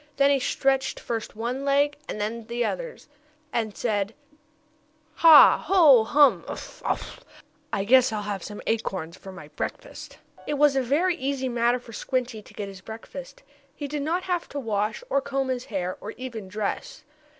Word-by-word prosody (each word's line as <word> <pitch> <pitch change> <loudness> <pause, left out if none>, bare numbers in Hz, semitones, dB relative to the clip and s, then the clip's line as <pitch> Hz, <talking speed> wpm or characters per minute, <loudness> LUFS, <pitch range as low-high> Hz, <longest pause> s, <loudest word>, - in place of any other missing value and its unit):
Then 280 0 +5
he 280 - +3
stretched 265 +1 0
first 225 -3 -5
one 240 +5 -3
leg 285 +1 +2
and - - -4
then 220 +2 -4
the 235 +1 -1
others, - - -5 0.5
and 220 -3 -2
said: 210 -2 -1 1.0
"Ha! 325 -3 +8
Ho! 310 - +7
Hum! 265 - +4
Uff! - - -8
Uff! - - -3 0.5
I 195 - -1
guess 255 +3 +5
I'll 210 -1 -3
have 200 -2 -4
some 210 +3 -8
acorns 190 -7 -2
for 190 - -11
my 170 -6 -11
breakfast." 150 - -7 0.3
It 295 - -1
was 290 -1 +4
a 270 - +3
very 315 +9 +1
easy 265 -2 -2
matter 240 0 +2
for 240 -2 -13
Squinty 245 -1 -2
to - - -17
get 205 -2 -4
his 195 -2 -10
breakfast. - - -10 0.3
He 290 - -5
did 290 +1 -3
not 335 +5 -1
have 355 -2 -2
to 285 - -4
wash, 215 - -2
or 280 - +1
comb 270 -1 -2
his 255 -1 -2
hair, 185 -4 -3
or 210 - -6
even 235 -6 -7
dress. 215 - -4
245 Hz, 175 wpm, -25 LUFS, 215-280 Hz, 1.0 s, Ha